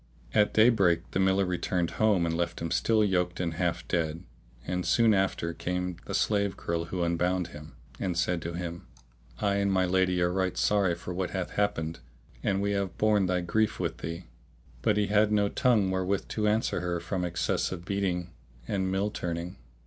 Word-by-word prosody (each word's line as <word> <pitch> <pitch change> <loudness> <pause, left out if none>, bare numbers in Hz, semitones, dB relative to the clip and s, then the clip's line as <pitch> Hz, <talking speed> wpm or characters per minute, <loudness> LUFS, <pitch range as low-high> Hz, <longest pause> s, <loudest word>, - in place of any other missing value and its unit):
At 105 -1 +4
day 110 +2 +7
break 90 -7 +2
the - - -1
miller 95 +1 +3
returned 90 -1 -1
home 105 -6 +4
and 80 0 -1
left 85 0 -2
him 85 -1 -4
still 110 -1 +3
yoked 90 -3 0
and 85 -2 -1
half - - -2
dead; 80 -1 -1 0.4
and 90 0 -2
soon 115 +2 +4
after 95 -4 0
in - - -11
came 90 +1 -2
the - - -2
slave 100 -2 +1
girl 85 0 -2
who 90 +1 -2
unbound 90 +1 0
him, 75 0 -11 0.2
and 90 -3 -2
said 90 0 +1
to 85 +1 -4
him, 85 0 -5 0.5
"I 100 0 +1
and 100 0 +1
my 95 -1 +3
lady 90 0 +2
are 90 0 +1
right 95 -1 -1
sorry 100 -4 +2
for 90 +1 -6
what 90 +1 -2
hath 95 -2 -3
happened 85 -6 -1 0.4
and 100 0 0
we 100 - +1
have 100 -2 -2
borne 105 -3 +3
thy 90 0 +1
grief 110 +5 0
with - - -2
thee." 85 +2 -5 0.6
But 105 +10 +2
he 105 - +3
had 105 +1 +3
no 105 -1 +3
tongue 105 -7 +2
wherewith 95 +1 -1
to 105 -1 0
answer 110 +2 +1
her 90 -1 -2
from 90 +2 -3
excess 90 0 -1
of 90 -2 -6
beating 90 -3 -1 0.4
and 95 -2 -1
mill 100 +2 0
turning. 85 0 -4
90 Hz, 195 wpm, -28 LUFS, 85-100 Hz, 0.6 s, day